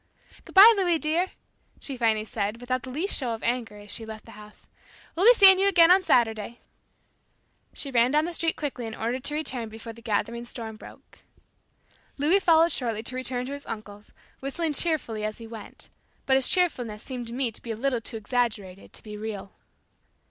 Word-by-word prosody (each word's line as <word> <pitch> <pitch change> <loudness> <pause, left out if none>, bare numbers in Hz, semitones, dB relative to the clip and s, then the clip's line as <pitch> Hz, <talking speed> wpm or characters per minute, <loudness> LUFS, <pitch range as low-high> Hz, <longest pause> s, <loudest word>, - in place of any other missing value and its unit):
"Good - - -15
bye, 420 +4 +10
Louis 355 -4 +2
dear!" 320 +4 0 0.5
she 275 - -6
finally 220 -3 +1
said 210 +1 -3
without 255 +1 -2
the 260 - -9
least 320 +10 -2
show 240 -4 -1
of 225 - -12
anger, 235 -3 -2
as 205 0 -11
she 230 - -4
left 220 -1 -9
the - - -13
house. 210 0 -14 0.5
"We'll 370 +6 +3
be - - +9
seeing 385 -3 +8
you 395 - +4
again 345 -3 +6
on 380 +1 +6
Saturday." 230 - +1 1.2
She 280 - -1
ran 240 -1 +4
down 300 +3 +2
the 345 - -4
street 330 -1 +1
quickly 265 -6 -4
in 220 - -7
order 235 +3 -2
to 280 +3 -1
return 255 -7 -3
before 225 +1 -9
the 230 - -15
gathering 235 +2 -2
storm 225 -2 -7
broke. - - -15 1.0
Louis 310 +8 +3
followed 335 -2 +4
shortly 225 -4 -2
to 255 - -3
return 250 -1 -3
to 265 - -6
his 285 0 -8
uncle's, 210 -1 -8 0.3
whistling 300 +4 -2
cheerfully 285 -9 0
as 215 0 -3
he 230 - -9
went; 225 -2 -9 0.3
but 265 - +3
his 265 -1 +3
cheerfulness 245 - 0
seemed 250 -3 -6
to 230 - -6
me 250 -2 -1
to - - -9
be 235 - -10
a 225 - -2
little 255 -1 -1
too 225 - -4
exaggerated 210 -4 -3
to - - -7
be 210 -1 -8
real. 210 -2 -6
245 Hz, 200 wpm, -26 LUFS, 220-305 Hz, 1.2 s, bye